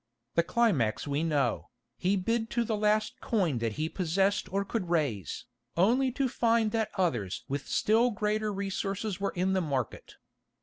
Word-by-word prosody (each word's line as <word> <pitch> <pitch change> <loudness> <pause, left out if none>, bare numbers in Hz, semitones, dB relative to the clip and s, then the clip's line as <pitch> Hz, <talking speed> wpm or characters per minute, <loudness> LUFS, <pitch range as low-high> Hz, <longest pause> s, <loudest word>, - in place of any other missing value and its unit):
The 170 - +4
climax 170 - +1
we 145 +1 0
know. 150 -4 0 0.3
He 190 +3 +1
bid 225 +4 0
to 235 - +1
the 225 -1 -1
last 215 +4 +1
coin 180 - +1
that 115 -2 -1
he 155 +7 -1
possessed 185 +2 0
or 200 +1 0
could 195 -4 -3
raise, 140 - -1 0.3
only 250 +9 +3
to 275 0 +1
find 230 -2 +2
that 220 -1 0
others 120 - 0
with 140 0 -3
still 225 +3 +3
greater 215 -1 -1
resources 195 0 -3
were 200 - 0
in 185 +2 +1
the 190 - +2
market. 135 - -3
195 Hz, 165 wpm, -29 LUFS, 160-220 Hz, 0.3 s, The